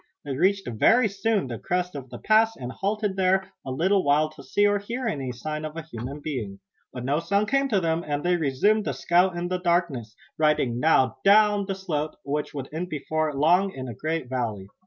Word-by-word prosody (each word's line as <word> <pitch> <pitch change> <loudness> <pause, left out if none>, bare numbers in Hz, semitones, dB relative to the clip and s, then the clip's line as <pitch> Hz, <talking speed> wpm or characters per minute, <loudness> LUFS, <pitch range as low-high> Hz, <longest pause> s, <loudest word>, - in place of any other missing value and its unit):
They 140 -2 -3
reached 195 +6 +1
very 225 - +4
soon 205 0 0
the 120 -3 -6
crest 180 0 -2
of 135 -3 -8
the 120 - -8
pass 220 - +3
and 125 -1 -6
halted 205 +4 -2
there 190 0 +2
a - - -7
little 185 +9 +2
while 150 +2 +2
to 155 -2 -13
see 205 +8 +1
or 205 0 +3
hear 235 +5 -5
any 140 - -2
sign 150 +5 -5
of 155 +1 -6
a 165 - -4
human 140 0 -7
being. 115 -10 -5 0.3
But 125 -1 -6
no 145 +3 +1
sound 200 +4 0
came 275 +1 +2
to 205 -5 +2
them 165 -1 0
and 145 -1 -2
they 180 0 +2
resumed 175 +8 +2
the 140 - -1
scout 175 +6 +2
in 175 +1 -2
the 185 0 -1
darkness, 170 - 0 0.2
riding 150 -6 +2
now 135 -3 +3
down 205 0 +5
the 195 - -2
slope 155 -5 -3
which 145 +1 -2
would 140 -3 -6
end 175 +3 -3
before 155 +1 -1
long 180 +7 +3
in 130 -1 -6
a 120 - -5
great 155 +4 -3
valley. 115 -7 -3
160 Hz, 215 wpm, -25 LUFS, 135-195 Hz, 0.3 s, down